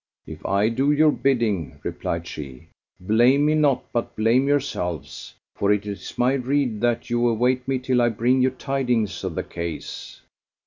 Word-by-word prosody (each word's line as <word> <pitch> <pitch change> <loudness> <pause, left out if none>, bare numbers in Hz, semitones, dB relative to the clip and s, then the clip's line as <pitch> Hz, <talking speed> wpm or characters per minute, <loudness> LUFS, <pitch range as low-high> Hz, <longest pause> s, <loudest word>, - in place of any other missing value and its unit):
"If - - -10
I 100 +3 +2
do 135 +5 +1
your 150 +1 +4
bidding," 115 - 0
replied 85 0 -3
she, 70 -6 -9 0.3
"blame 120 +9 +3
me 155 - +3
not 145 -4 +2
but 120 - -2
blame 115 +5 +2
yourselves; 110 - -2 0.2
for 100 - +1
it 105 0 +1
is 100 -1 -7
my 125 +2 +3
rede 130 -4 0
that 120 0 0
you 120 0 +2
await 125 +3 +1
me 135 -1 +1
till 130 -1 +1
I 120 - +3
bring 120 +4 +1
you 130 - +4
tidings 125 -5 -1
of - - -3
the - - -2
case." 85 -2 -7
120 Hz, 170 wpm, -23 LUFS, 105-135 Hz, 0.3 s, your